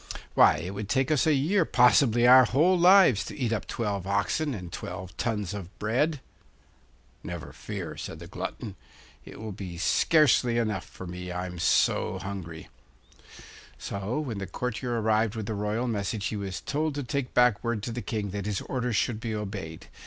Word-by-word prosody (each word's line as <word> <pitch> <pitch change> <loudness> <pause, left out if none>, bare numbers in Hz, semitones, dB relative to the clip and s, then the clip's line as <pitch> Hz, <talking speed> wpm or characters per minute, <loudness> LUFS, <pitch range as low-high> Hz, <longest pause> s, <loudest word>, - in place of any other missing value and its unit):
Why, - - +6
it 90 +3 -5
would 100 0 -6
take 135 +5 +1
us 155 0 +2
a 155 - +5
year, 170 +8 +2
possibly 120 -3 +4
our 130 +1 +8
whole 160 +10 +3
lives, 175 - +6
to - - -8
eat 120 -5 0
up 105 - -3
twelve 100 -5 -3
oxen 110 +9 0
and 90 -4 -8
twelve 90 +2 -7
tons 105 -5 -2
of 95 -2 -8
bread.' 130 +7 0 1.0
'Never - - -7
fear,' - - -6
said - - -6
the - - -10
glutton. - - -6 0.5
'It - - -11
will 110 -1 -6 0.2
scarcely 125 - +3
be - - +2
enough 105 -5 -1
for 95 - -10
me, 90 0 -6
I'm 90 0 -5
so 90 - +2
hungry.' 90 -4 -7 1.1
So 100 +7 -3
when 120 -9 -4
the 95 - -5
courtier 120 +3 -3
arrived 110 0 +1
with 110 -2 -4
the 110 - -3
royal 105 +4 -1
message 100 -2 -2
he - - -2
was 100 -2 -4
told 155 0 -2
to 145 - -3
take 135 0 -3
back 125 -4 +4
word 115 -3 -2
to 120 - -3
the 120 +1 -4
King 105 -5 -3
that 100 0 -4
his 105 -2 -2
orders 125 -3 -2
should 110 +1 0
be 115 -1 -3
obeyed. 95 -6 -6
110 Hz, 180 wpm, -27 LUFS, 100-125 Hz, 1.1 s, our